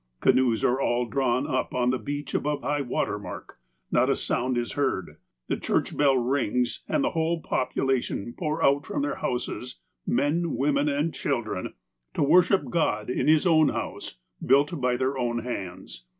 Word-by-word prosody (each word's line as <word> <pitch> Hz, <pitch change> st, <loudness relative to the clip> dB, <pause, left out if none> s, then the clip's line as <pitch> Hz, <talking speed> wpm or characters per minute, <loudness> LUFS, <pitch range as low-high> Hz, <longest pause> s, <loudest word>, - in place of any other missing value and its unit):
Canoes 125 Hz, -3 st, +3 dB
are 130 Hz, +2 st, +2 dB
all 120 Hz, -1 st, +1 dB
drawn 130 Hz, +1 st, 0 dB
up 130 Hz, 0 st, -2 dB
on 125 Hz, 0 st, +2 dB
the 130 Hz, -, -1 dB
beach 145 Hz, 0 st, -5 dB
above 150 Hz, 0 st, -1 dB
high 145 Hz, 0 st, 0 dB
water 120 Hz, -5 st, -1 dB
mark. 100 Hz, -, -9 dB, 0.3 s
Not -, -, +3 dB
a -, -, +3 dB
sound 125 Hz, 0 st, -1 dB
is 120 Hz, -3 st, -2 dB
heard. 130 Hz, -10 st, -2 dB, 0.3 s
The -, -, -1 dB
church -, -, -1 dB
bell 140 Hz, -2 st, +4 dB
rings, 125 Hz, -1 st, 0 dB
and 290 Hz, -, +1 dB
the 290 Hz, -, +1 dB
whole 165 Hz, 0 st, 0 dB
population 125 Hz, -3 st, -1 dB
pour 155 Hz, -1 st, -2 dB
out 140 Hz, +1 st, +3 dB
from -, -, -2 dB
their 145 Hz, -, -2 dB
houses 125 Hz, 0 st, -4 dB
— -, -, -54 dB
men, 165 Hz, +3 st, +1 dB
women, 140 Hz, +1 st, +1 dB
and 145 Hz, +3 st, 0 dB
children 120 Hz, -8 st, -3 dB, 0.2 s
— -, -, -52 dB
to -, -, +2 dB
worship 180 Hz, +6 st, +4 dB
God 115 Hz, -10 st, 0 dB
in -, -, -1 dB
His 155 Hz, +1 st, +4 dB
own 155 Hz, -3 st, +5 dB
house, -, -, -5 dB, 0.3 s
built 145 Hz, +3 st, +3 dB
by 125 Hz, -1 st, +1 dB
their 130 Hz, +1 st, -1 dB
own 120 Hz, -2 st, -1 dB
hands. 90 Hz, -, -6 dB
130 Hz, 180 wpm, -26 LUFS, 120-145 Hz, 0.3 s, own